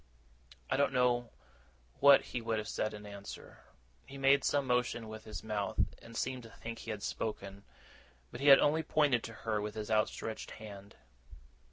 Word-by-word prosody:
I -, -, 0 dB
don't 140 Hz, -1 st, +2 dB
know 120 Hz, -2 st, +2 dB, 0.7 s
what 140 Hz, 0 st, +8 dB
he 125 Hz, -, -5 dB
would 115 Hz, -1 st, -1 dB
have 105 Hz, 0 st, -3 dB
said 110 Hz, +1 st, -2 dB
in 105 Hz, 0 st, -10 dB
answer. 100 Hz, -1 st, -9 dB, 0.5 s
He 135 Hz, -, -9 dB
made 135 Hz, +1 st, +4 dB
some 140 Hz, -1 st, +1 dB
motion 125 Hz, -2 st, 0 dB
with 110 Hz, 0 st, -9 dB
his 110 Hz, -, -7 dB
mouth, 105 Hz, -3 st, -3 dB, 0.2 s
and 115 Hz, 0 st, -10 dB
seemed 130 Hz, -1 st, -2 dB
to 115 Hz, -, -12 dB
think 115 Hz, 0 st, -8 dB
he -, -, -9 dB
had 105 Hz, -2 st, -4 dB
spoken; 100 Hz, -2 st, -4 dB, 0.7 s
but -, -, -8 dB
he 145 Hz, -, +1 dB
had 135 Hz, -1 st, +11 dB
only 155 Hz, +2 st, +3 dB
pointed 145 Hz, -5 st, +2 dB
to 115 Hz, -, -7 dB
her 110 Hz, -2 st, 0 dB
with 105 Hz, 0 st, -5 dB
his 110 Hz, 0 st, -5 dB
outstretched 110 Hz, +1 st, -1 dB
hand. 100 Hz, -2 st, -10 dB
115 Hz, 180 wpm, -33 LUFS, 105-130 Hz, 0.7 s, had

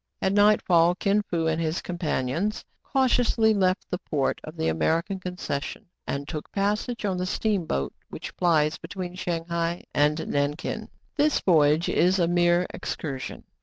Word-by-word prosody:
At 190 Hz, -, +1 dB
nightfall 185 Hz, -5 st, +4 dB
Kin 200 Hz, +2 st, +2 dB
Fo 170 Hz, -5 st, -2 dB
and 160 Hz, 0 st, +1 dB
his 160 Hz, +1 st, -1 dB
companions 170 Hz, +3 st, -2 dB, 0.2 s
cau 265 Hz, -1 st, +2 dB
tiously 230 Hz, -3 st, +3 dB
left 185 Hz, -1 st, +1 dB
the 180 Hz, -, -1 dB
port 145 Hz, -7 st, -1 dB
of -, -, -9 dB
the 80 Hz, -, 0 dB
American 165 Hz, -, 0 dB
concession, 180 Hz, -1 st, -4 dB, 0.2 s
and 140 Hz, 0 st, -3 dB
took 155 Hz, -2 st, -6 dB
passage 210 Hz, +4 st, -1 dB
on 190 Hz, -2 st, 0 dB
the 180 Hz, 0 st, -2 dB
steamboat 185 Hz, -, -1 dB, 0.2 s
which -, -, -8 dB
plies 155 Hz, -4 st, +2 dB
between 175 Hz, +1 st, -6 dB
Shang 170 Hz, -2 st, -3 dB
hai 170 Hz, 0 st, -2 dB
and 150 Hz, +1 st, +3 dB
Nankin. 145 Hz, +1 st, -2 dB, 0.3 s
This 295 Hz, 0 st, +3 dB
voyage 155 Hz, -2 st, +4 dB
is 185 Hz, +2 st, +3 dB
a 175 Hz, -2 st, +2 dB
mere 175 Hz, 0 st, +3 dB
excursion. 135 Hz, -4 st, -5 dB
175 Hz, 155 wpm, -26 LUFS, 155-195 Hz, 0.3 s, nightfall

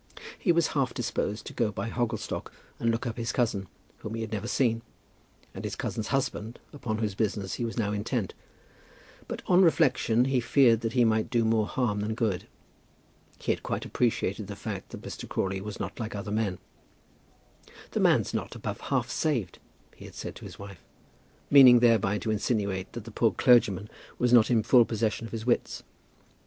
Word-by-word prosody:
He 180 Hz, -, +3 dB
was 170 Hz, -1 st, +2 dB
half 135 Hz, -4 st, -1 dB
disposed 110 Hz, -4 st, -2 dB
to -, -, -8 dB
go 115 Hz, -3 st, 0 dB
by 115 Hz, -, -4 dB
Hogglestock 120 Hz, -3 st, -3 dB, 0.3 s
and 115 Hz, -, +1 dB
look 115 Hz, 0 st, -1 dB
up 115 Hz, -1 st, -4 dB
his 115 Hz, 0 st, -2 dB
cousin, 110 Hz, -7 st, 0 dB, 0.3 s
whom 110 Hz, +1 st, -6 dB
he 115 Hz, -, -4 dB
had 110 Hz, 0 st, -5 dB
never 110 Hz, +1 st, -3 dB
seen, 115 Hz, -3 st, +1 dB, 0.7 s
and -, -, -7 dB
his -, -, -3 dB
cousin's 110 Hz, -, -3 dB
husband, 120 Hz, -4 st, -2 dB, 0.2 s
upon 125 Hz, -7 st, -3 dB
whose 110 Hz, -3 st, -1 dB
business 100 Hz, -1 st, -2 dB
he 120 Hz, -, -2 dB
was 115 Hz, -, -5 dB
now 105 Hz, -3 st, 0 dB
intent; 105 Hz, 0 st, -2 dB, 0.9 s
but -, -, -6 dB
on 180 Hz, +1 st, +5 dB
reflection 135 Hz, -8 st, +3 dB
he 135 Hz, -1 st, +2 dB
feared 120 Hz, -1 st, +4 dB
that 115 Hz, -1 st, -2 dB
he 125 Hz, -2 st, +4 dB
might 110 Hz, -1 st, +1 dB
do 115 Hz, -2 st, +2 dB
more 110 Hz, -1 st, +2 dB
harm 115 Hz, -5 st, -1 dB
than 105 Hz, +2 st, -2 dB
good. 105 Hz, -7 st, -1 dB, 0.9 s
He -, -, -1 dB
had -, -, -2 dB
quite -, -, -3 dB
appreciated 110 Hz, -4 st, -1 dB
the 100 Hz, -, -6 dB
fact -, -, -6 dB
that -, -, -9 dB
Mr. -, -, -7 dB
Crawley 95 Hz, 0 st, -1 dB
was 105 Hz, +1 st, -7 dB
not 100 Hz, +4 st, -5 dB
like 110 Hz, -2 st, -4 dB
other 100 Hz, 0 st, -5 dB
men. 105 Hz, -4 st, 0 dB, 1.3 s
"The -, -, -1 dB
man's -, -, +3 dB
not -, -, -3 dB
above -, -, -5 dB
half -, -, 0 dB
saved," 120 Hz, -, -1 dB, 0.4 s
he -, -, -12 dB
had -, -, -12 dB
said -, -, -6 dB
to -, -, -11 dB
his -, -, -10 dB
wife, 100 Hz, -2 st, -10 dB, 0.7 s
meaning 130 Hz, -3 st, +9 dB
thereby 115 Hz, -4 st, +3 dB
to 110 Hz, -, -2 dB
insinuate 100 Hz, -3 st, -1 dB
that 120 Hz, -, -6 dB
the 115 Hz, -, -10 dB
poor 110 Hz, 0 st, +2 dB
clergyman 105 Hz, -3 st, +4 dB, 0.3 s
was 125 Hz, 0 st, +2 dB
not 115 Hz, -3 st, +6 dB
in 115 Hz, -3 st, +3 dB
full 120 Hz, +2 st, +6 dB
possession 115 Hz, 0 st, -2 dB
of -, -, -14 dB
his 115 Hz, -1 st, -5 dB
wits. 120 Hz, -, 0 dB
115 Hz, 190 wpm, -28 LUFS, 105-120 Hz, 1.3 s, meaning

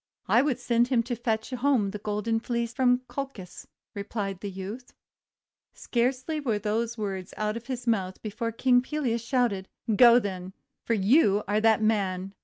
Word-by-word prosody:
'I 225 Hz, +6 st, +5 dB
would 275 Hz, -3 st, 0 dB
send 235 Hz, 0 st, +2 dB
him 245 Hz, -3 st, +2 dB
to 240 Hz, +1 st, -3 dB
fetch 225 Hz, 0 st, -2 dB
home 250 Hz, -5 st, +1 dB
the 210 Hz, -, -6 dB
Golden 210 Hz, +2 st, -1 dB
Fleece 235 Hz, 0 st, -2 dB
from 250 Hz, -1 st, +3 dB
Colchis," 265 Hz, -10 st, -7 dB, 0.3 s
replied 200 Hz, -2 st, -4 dB
the 200 Hz, -, -5 dB
youth. 195 Hz, +6 st, -8 dB, 0.8 s
Scarcely 260 Hz, +5 st, -1 dB
were 240 Hz, -8 st, 0 dB
these 225 Hz, +3 st, -2 dB
words 195 Hz, -3 st, -4 dB
out 215 Hz, 0 st, -1 dB
of 235 Hz, 0 st, -7 dB
his 250 Hz, -2 st, -4 dB
mouth 190 Hz, -5 st, 0 dB
before 230 Hz, +2 st, -3 dB
King 245 Hz, +2 st, +3 dB
Pelias 255 Hz, -4 st, -2 dB
shouted: 235 Hz, -7 st, 0 dB
— 220 Hz, -, -1 dB
'Go, 235 Hz, +2 st, +8 dB
then, 190 Hz, -4 st, -3 dB, 0.3 s
for 230 Hz, -, +1 dB
you 210 Hz, 0 st, +4 dB
are 210 Hz, +2 st, +1 dB
that 220 Hz, -1 st, +4 dB
man! 195 Hz, -3 st, 0 dB
225 Hz, 170 wpm, -27 LUFS, 205-245 Hz, 0.8 s, Go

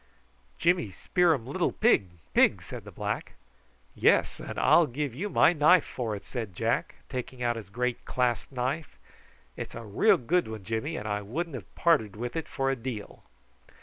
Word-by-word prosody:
"Jimmy 170 Hz, -, +2 dB
spear 175 Hz, -, +2 dB
um 115 Hz, -5 st, -7 dB
lil 170 Hz, +7 st, 0 dB
pig, 215 Hz, -, +3 dB, 0.2 s
pig," -, -, +4 dB
said -, -, -8 dB
the -, -, -9 dB
black. -, -, -4 dB, 0.6 s
"Yes, -, -, +3 dB
and -, -, -7 dB
I'll 170 Hz, -2 st, +5 dB
give 140 Hz, 0 st, -3 dB
you 190 Hz, -, -3 dB
my 175 Hz, -, +5 dB
knife 160 Hz, +2 st, +5 dB
for 115 Hz, -4 st, -3 dB
it," 100 Hz, -, -9 dB
said 110 Hz, -8 st, -5 dB
Jack, -, -, -1 dB
taking 125 Hz, 0 st, -5 dB
out 120 Hz, -1 st, +1 dB
his 110 Hz, -4 st, -8 dB
great 125 Hz, +3 st, -2 dB
clasp 125 Hz, 0 st, -1 dB
knife. 135 Hz, +5 st, -3 dB, 0.6 s
"It's -, -, -7 dB
a 115 Hz, 0 st, -7 dB
real 100 Hz, -1 st, +4 dB
good 170 Hz, +8 st, +1 dB
one, 110 Hz, -2 st, -7 dB
Jimmy, 115 Hz, -, -3 dB
and 105 Hz, -, -5 dB
I 105 Hz, 0 st, -1 dB
wouldn't 155 Hz, +11 st, -4 dB
have 120 Hz, -9 st, -9 dB
parted 145 Hz, -, +2 dB
with 120 Hz, +5 st, -5 dB
it 165 Hz, -, -3 dB
for 135 Hz, 0 st, -1 dB
a -, -, 0 dB
deal." 115 Hz, -4 st, -6 dB
125 Hz, 180 wpm, -28 LUFS, 110-160 Hz, 0.6 s, I'll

